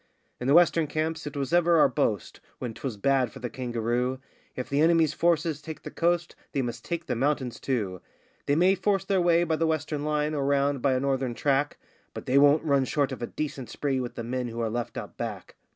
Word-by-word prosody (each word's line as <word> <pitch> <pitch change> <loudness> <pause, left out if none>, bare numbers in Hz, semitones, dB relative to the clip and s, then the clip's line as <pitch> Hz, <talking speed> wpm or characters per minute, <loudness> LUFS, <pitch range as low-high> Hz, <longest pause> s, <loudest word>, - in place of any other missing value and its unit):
In 125 - -3
the 140 - +5
western 170 -2 +5
camps 155 +1 -2
it 145 - -6
was 140 +3 -2
ever 175 -1 +4
our 155 - +6
boast, 110 -6 -1 0.2
when 120 -3 -5
'twas 115 -1 -5
bad 130 +2 +2
for - - -11
the 125 -2 -5
kangaroo: 120 +1 -1 0.4
'If 125 - -4
the 140 +2 +1
enemy's 165 -2 +4
forces 165 -2 +1
take 160 +1 -8
the - - -7
coast, 170 0 0 0.2
they 140 -3 0
must 120 -1 -5
take 170 -1 -4
the 125 - -2
mountains, 130 -1 -1
too; 100 -9 -2 0.5
They 145 - +3
may 180 +4 +5
force 195 0 0
their 190 -2 +2
way 175 0 +4
by 160 -2 0
the 165 +1 +1
western 155 -2 -1
line 150 0 0
or 145 -2 -1
round 140 -1 +1
by 135 0 +3
a 130 - +1
northern 135 -2 -1
track, 140 +2 +1 0.4
But - - -7
they 135 +2 +4
won't 145 +2 +5
run 140 -3 +2
short 140 0 0
of - - -6
a 120 - -2
decent 140 -4 -5
spree 135 -3 -1
with 120 -1 -5
the 115 - -4
men 125 +1 -2
who 115 0 -6
are 115 -2 -1
left 120 0 -4
out - - -7
back! - - -5
140 Hz, 230 wpm, -27 LUFS, 125-160 Hz, 0.5 s, our